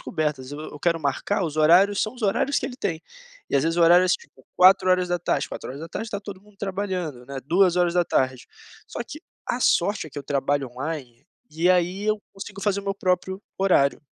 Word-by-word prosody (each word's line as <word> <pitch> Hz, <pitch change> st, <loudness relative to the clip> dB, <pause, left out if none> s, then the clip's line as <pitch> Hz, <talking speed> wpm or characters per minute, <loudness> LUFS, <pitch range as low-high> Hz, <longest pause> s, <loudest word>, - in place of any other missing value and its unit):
cobertas. 150 Hz, -4 st, -3 dB
Eu 145 Hz, -, -7 dB
eu 150 Hz, -1 st, -9 dB
quero 170 Hz, 0 st, +1 dB
marcar 160 Hz, +7 st, -1 dB
os 155 Hz, -2 st, -4 dB
horários 180 Hz, +6 st, +5 dB
são 215 Hz, +3 st, -2 dB
os 245 Hz, -, -12 dB
horários 215 Hz, +7 st, +1 dB
que -, -, -5 dB
ele 250 Hz, -, -4 dB
tem. 175 Hz, -10 st, -3 dB, 0.5 s
E, -, -, -2 dB
às 140 Hz, -, +4 dB
vezes, 165 Hz, +2 st, 0 dB
os 175 Hz, -, +4 dB
horários, 175 Hz, +2 st, +6 dB
tipo, -, -, -13 dB
16h. 185 Hz, -2 st, +3 dB
16h 160 Hz, -, -6 dB
está 210 Hz, -2 st, -4 dB
todo 200 Hz, -2 st, -9 dB
mundo 205 Hz, 0 st, -22 dB
trabalhando, 185 Hz, -10 st, -4 dB
né, 140 Hz, +1 st, -7 dB
14h. 175 Hz, -6 st, +2 dB, 0.4 s
Só -, -, -7 dB
que, 305 Hz, -, -9 dB, 0.3 s
a 245 Hz, -, -2 dB
sorte, 200 Hz, -4 st, +2 dB
é -, -, -12 dB
que 145 Hz, -, -7 dB
eu -, -, -6 dB
trabalho 140 Hz, -1 st, -1 dB
online, 130 Hz, -3 st, -6 dB, 0.2 s
e 165 Hz, +3 st, +1 dB
aí 180 Hz, +2 st, +2 dB
eu 215 Hz, 0 st, +1 dB
consigo 195 Hz, 0 st, -9 dB
fazer 200 Hz, -1 st, +1 dB
o -, -, -14 dB
meu 195 Hz, -, -1 dB
próprio 190 Hz, 0 st, -1 dB, 0.2 s
horário. 175 Hz, -9 st, +3 dB
180 Hz, 190 wpm, -24 LUFS, 150-195 Hz, 0.5 s, horários